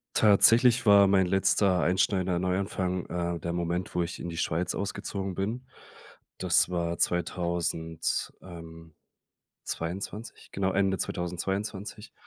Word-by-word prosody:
Tatsächlich 115 +4 +5
war 100 -2 +7
mein 95 -1 +3
letzter 95 0 +2
einschneidender 95 0 +1
Neuanfang, 90 0 -2
äh, 85 -1 -3
der 85 - -4
Moment, 85 +1 -3
wo 90 - +2
ich 85 - -6
in 85 - -5
die 85 - -7
Schweiz 85 +2 -1
ausgezogen 100 -1 -4
bin. 110 +8 -3 0.7
Das 90 0 +3
war 85 -1 -2
2000 85 -2 -1
ähm, 80 -2 -11 0.7
22, 95 +6 -6
genau 95 -1 -1
Ende 95 0 +1
2022. 95 +4 -4
90 Hz, 115 wpm, -28 LUFS, 85-100 Hz, 0.7 s, war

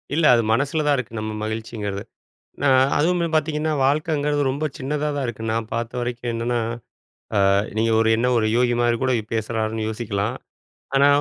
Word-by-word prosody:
இல்ல. 165 0 +2
அது 115 - +3
மனசில 145 +5 0
தான் 145 - +4
இருக்கு 115 -3 -4
நம்ம 110 0 -3
மகிழ்ச்சிங்கிறது. 110 -2 -4 0.6
ஏன்னா 145 0 +2 0.3
அதுவுமே 170 +2 +2
பார்த்தீங்கன்னா 155 0 0
வாழ்க்கைங்கிறது 145 +1 +1
ரொம்ப 140 +4 -3
சின்னதா 150 +2 -2
தான் 140 - -1
இருக்கு, 115 -2 -6
நான் 115 -1 -2
பார்த்த 115 +2 -3
வரைக்கும். 120 0 -3
என்னன்னா 120 +1 -1 0.9
அ - - +4 0.3
நீங்க 115 +1 +2
ஒரு 115 - +3
என்ன 125 +2 +1
ஒரு 110 - +1
யோகி 120 0 +3
மாரி 120 -1 +2
கூட 130 0 +2
இப் 110 - -16
பேசுறார்ன்னு 110 0 -2
யோசிக்கலாம். 105 -2 -2 0.6
ஆனா, 140 +1 +6
120 Hz, 165 wpm, -22 LUFS, 110-145 Hz, 0.9 s, ஆனா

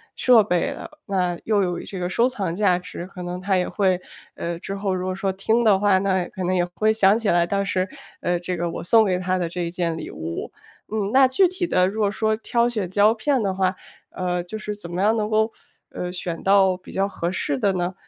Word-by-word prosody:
设 245 -4 +5
备 180 -4 0
了， - - -8 0.2
那 180 -3 0
又 210 -2 +2
有 175 -2 -1
这 190 - -7
个 180 0 -2
收 235 +6 +3
藏 200 -10 -3
价 185 -3 +2
值。 180 -1 -8
可 185 0 -10
能 180 0 -4
他 190 +1 0
也 180 - 0
会 185 -3 +1 0.3
呃， 170 0 -4
之 190 +3 -6
后 195 -1 -1
如 185 0 -3
果 185 - -1
说 195 +1 -1
听 220 +5 +1
的 210 -4 +5
话， 200 -2 +4
那 190 -2 +1
可 185 - -6
能 185 +1 0
也 175 -1 +2
会 215 +5 +1
想 210 -1 +4
起 225 - -1
来， 170 0 +3
当 200 +3 0
时， 185 -1 -1 0.3
呃， 175 0 0
这 180 +1 -4
个 170 0 -1
我 - - -6
送 220 +5 +5
给 185 -2 0
他 185 0 0
的 175 -2 -1
这 170 0 -3
件 170 -1 -2
礼 - - -6
物。 80 +1 -6 0.4
嗯， 210 -2 -1
那 265 0 +7
具 360 +9 +4
体 365 0 -2
的 185 - +3
如 215 +3 -3
果 205 - +3
说 220 +1 0
挑 235 +2 +1
选 215 -7 -2
胶 205 +3 +4
片 260 +3 0
的 195 -2 0
话， 190 0 0 0.3
呃， 180 -1 -2
就 200 +5 -6
是 210 -1 -5
怎 205 -4 -9
么 175 +2 -2
样 215 +2 +4
能 215 -1 -1
够， 220 +1 +1 0.4
呃， 180 0 -4
选 180 -2 -4
到 195 -1 +4
比 185 - -13
较 195 +1 0
合 175 -3 -3
适 145 -6 -1
的 200 - +2
呢？ 180 0 -2
190 Hz, 260 characters per minute, -23 LUFS, 180-215 Hz, 0.4 s, 那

